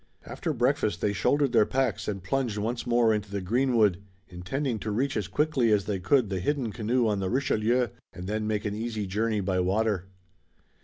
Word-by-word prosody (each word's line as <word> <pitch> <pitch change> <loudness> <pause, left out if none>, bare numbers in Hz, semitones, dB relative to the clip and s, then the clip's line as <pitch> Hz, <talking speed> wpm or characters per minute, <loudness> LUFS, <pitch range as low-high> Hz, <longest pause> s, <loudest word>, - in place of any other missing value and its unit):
After - - -3
breakfast - - +1
they 100 - 0
shouldered 140 +6 +2
their 110 -3 +4
packs 135 0 -1
and 100 -3 -3
plunged 120 +1 -1
once 115 +4 -3
more 120 -2 +4
into 105 -1 -3
the 100 0 -3
greenwood, 110 -2 +2 0.3
intending 110 +8 -3
to 110 - -4
reach 130 +6 0
as 105 -4 -1
quickly 130 +1 +1
as 100 -3 +2
they 100 -3 -2
could 115 +2 +2
the 95 - -1
hidden 125 +3 -1
canoe 115 +2 0
on 105 -2 0
the 95 -1 -1
Richelieu, 120 -1 +1 0.2
and 90 0 -8
then 105 +2 -2
make 105 -1 -1
an 105 - -1
easy 110 -1 -3
journey 105 +2 0
by 95 -1 0
water. 95 0 0
110 Hz, 195 wpm, -27 LUFS, 100-120 Hz, 0.3 s, their